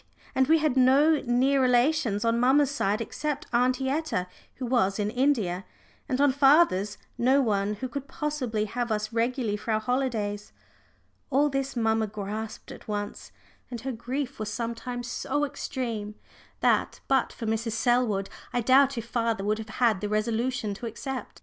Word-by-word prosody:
And 265 0 +2
we 320 +2 +5
had 305 -4 +1
no 275 +4 +5
near 265 +3 +3
relations 245 -4 +2
on 230 0 +2
mamma's 270 +3 +4
side 210 -5 0
except 295 +5 -3
Aunty 255 +2 +2
Etta, 280 - -1 0.3
who 255 - -5
was 230 -6 +1
in 210 0 -1
India, 225 -9 +1 0.5
and 260 -1 0
on 285 -1 +5
father's 270 - +4 0.2
no 260 +4 +4
one 210 -4 +1
who 255 +5 -4
could 275 +2 -6
possibly 265 -8 -2
have 240 +2 -3
us 215 +1 -2
regularly 230 -2 0
for 215 - -9
our 215 - +2
holidays. 220 -4 -2 0.8
All 290 +2 +3
this 275 -1 -2
mamma 225 -2 +1
grasped 210 +1 -6
at - - -12
once, 205 -1 -5 0.4
and 240 -3 -6
her 265 +2 -3
grief 255 +3 -4
was 215 -1 -3
sometimes 235 +2 -4
so 290 +4 -1
extreme 230 -7 -4 0.5
that, - - +2
but 265 -1 +2
for 230 - -7
Mrs. 225 +1 -1
Selwood, 230 -4 +1 0.3
I 245 - +1
doubt 270 +2 +4
if 230 - -3
father 230 -3 -1
would 215 +2 0
have 220 0 -7
had 225 -6 +3
the 210 - -2
resolution 220 +1 -1
to 230 +4 -6
accept. 260 +3 -6
240 Hz, 165 wpm, -27 LUFS, 215-265 Hz, 0.8 s, we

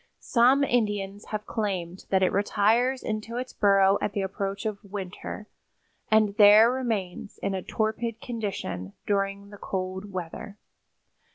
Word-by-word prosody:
Some 260 +3 +4
Indians 205 -5 -1
have 210 -1 -5
claimed 190 -5 -3
that 190 -1 +3
it 185 - +3
retires 220 +6 +2
into 220 +2 -4
its 255 +1 -5
burrow 195 -1 +4
at 205 - -1
the 200 - -1
approach 195 +1 -4
of 215 -1 -3
winter, 200 +1 -7 0.6
and 215 -2 +3
there 215 +3 +8
remains 220 -8 -3
in 200 - 0
a 190 - -2
torpid 220 +3 -2
condition 190 - -5
during 200 0 -1
the 205 - -12
cold 190 +1 -4
weather. 185 +3 -6
205 Hz, 135 wpm, -26 LUFS, 195-220 Hz, 0.6 s, there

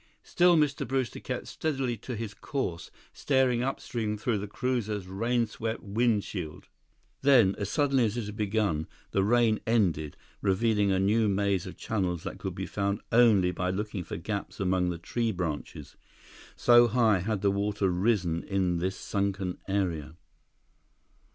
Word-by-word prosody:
Still 175 -1 +4
Mr. 150 -3 +1
Brewster 130 -4 -1
kept - - -4
steadily 135 -6 -2
to 125 +4 -6
his 110 -1 -5
course, 110 - -4 0.2
staring 130 -3 +2
upstream 115 -4 -2
through 110 0 -1
the 105 - -5
cruiser's 110 -4 -2
rainswept 115 +3 -1
windshield. 105 -6 -1 0.6
Then, 125 -8 +5
as 100 -1 -2
suddenly 135 -3 +2
as 110 +2 -2
it 115 - -2
had 105 0 -7
begun, 105 -7 0 0.2
the 95 - +2
rain 115 0 +3
ended, 85 -10 +1 0.2
revealing 100 +1 +2
a 95 - +2
new 105 +3 +3
maze 100 -2 0
of - - -9
channels 90 -6 -2
that - - -6
could - - -4
be - - -4
found 100 0 -1
only 110 -6 +5
by 90 +1 -2
looking 100 0 -3
for 80 - -6
gaps 100 +4 -5
among 90 -2 +1
the 85 - -3
tree 115 +6 -1
branches, 85 -6 -5 0.6
so 120 0 +6
high 110 -4 +3
had 100 +2 -2
the 100 - +4
water 100 0 0
risen 90 -3 +1
in 95 -3 0
this 95 +2 -1
sunken 100 -2 -2
area. 85 -6 -2
105 Hz, 150 wpm, -28 LUFS, 95-120 Hz, 0.6 s, so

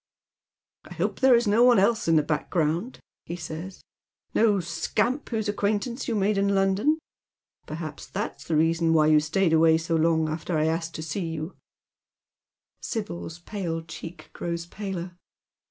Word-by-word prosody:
" - - -68
I - - -9
hope - - -2
there 260 -2 +6
is 235 0 +2
no 215 +3 +4
one 245 -1 +6
else 220 +2 +2
in 165 - +4
the 155 - +4
background," 160 - -1 0.3
he 170 - -4
says, 170 +2 -7 0.2
" - - -52
no 210 -3 +3
scamp 185 - -1
whose 220 -3 -1
acquaintance 210 +4 -1
you 235 - 0
made 205 0 +2
in 200 0 +2
London. 195 +11 +2 0.7
Perhaps 155 -1 -6
that's 140 - -5
tlic 160 - +1
reason 165 +1 +2
why 155 -1 +5
you 155 0 +6
stayed 160 +3 +1
away 160 0 +5
so 165 +1 -1
long 160 0 +2
after 160 +2 -2
I 155 - +2
had 160 +1 +2
asked 165 0 -7
to 155 - -5
see 165 +1 -3
yoii." 155 +4 -5 1.3
Sibyl's 205 -7 -5
pale 175 -3 -4
cheek 155 +1 -10
grows 170 0 -4
paler. 180 -2 -6
170 Hz, 170 wpm, -26 LUFS, 160-205 Hz, 1.3 s, there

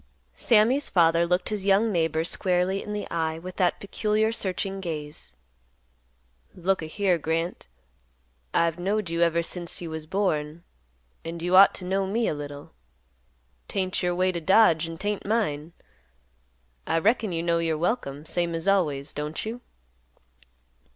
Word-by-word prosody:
Sammy's 240 +5 +3
father 170 -1 +3
looked 180 +1 0
his 210 -3 -3
young 200 +3 +3
neighbor 160 -3 +1
squarely 180 +2 0
in 210 - -7
the 210 0 -4
eye 160 -1 -1
with 180 +2 -9
that 180 -2 +1
peculiar 215 +2 0
searching 195 -2 -2
gaze; 150 -4 -6 1.2
"Look 190 +1 0
a 160 - -5
here, 185 +1 +1
Grant. 165 - -2 0.8
I've 170 0 +1
knowed 195 0 -1
you 170 0 -1
ever 170 0 +3
since 175 0 -2
you 170 -2 -6
was 160 -1 -6
born, 165 -4 -1 0.6
and 165 +1 -6
you 175 +2 +1
ought 195 +1 +8
to 180 - -7
know 190 +1 0
me 225 +4 0
a - - 0
little. 145 -1 -8 1.0
'Tain't 185 -2 -2
your 175 0 0
way 185 +1 +2
to 170 -2 -4
dodge, 170 -3 +4
and 165 -1 -8
'tain't 205 0 -2
mine. 175 -8 -1 1.2
I - - +1
reckon 215 +3 +2
you 165 -1 -2
know 170 -1 +1
you're 165 -2 0
welcome, 155 - -2
same 170 +1 0
as 165 +3 -3
always, 155 -8 +1
don't 150 +5 -4
you?" 235 +3 -5
175 Hz, 155 wpm, -26 LUFS, 165-195 Hz, 1.2 s, ought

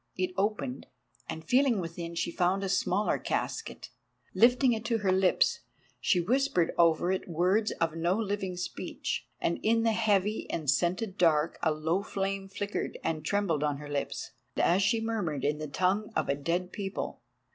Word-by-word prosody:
It 185 0 0
opened, 190 -11 -2 0.4
and 160 0 -5
feeling 250 - +3
within 170 -1 -5
she 170 - -1
found 185 +3 +1
a 195 - -1
smaller 195 +2 +1
casket. - - -3 0.4
Lifting 250 +1 +5
it 220 -1 -3
to 230 -1 +1
her 200 -3 +1
lips 185 0 +3 0.4
she 180 - +2
whispered 200 -3 +1
over 170 +1 +3
it 190 - -2
words 185 +6 +2
of 165 -1 -1
no 170 +3 +1
living 200 -4 -2
speech, 180 - -4
and 170 - 0
in 225 +1 +2
the 225 - +3
heavy 210 -1 +1
and 155 -3 -3
scented 185 - 0
dark 160 -2 +3
a 160 - +3
low 160 +5 0
flame 195 -1 -3
flickered 205 +1 -3
and 155 -2 -1
trembled 170 -4 0
on 145 -1 0
her 145 0 -9
lips, 145 -1 -3 0.3
as 180 +3 +3
she 225 +3 +2
murmured 200 - -2
in 150 +1 0
the 155 - -4
tongue 190 +8 0
of - - 0
a - - +4
dead 175 +5 -2
people. 195 -1 -4
185 Hz, 170 wpm, -29 LUFS, 165-210 Hz, 0.4 s, Lifting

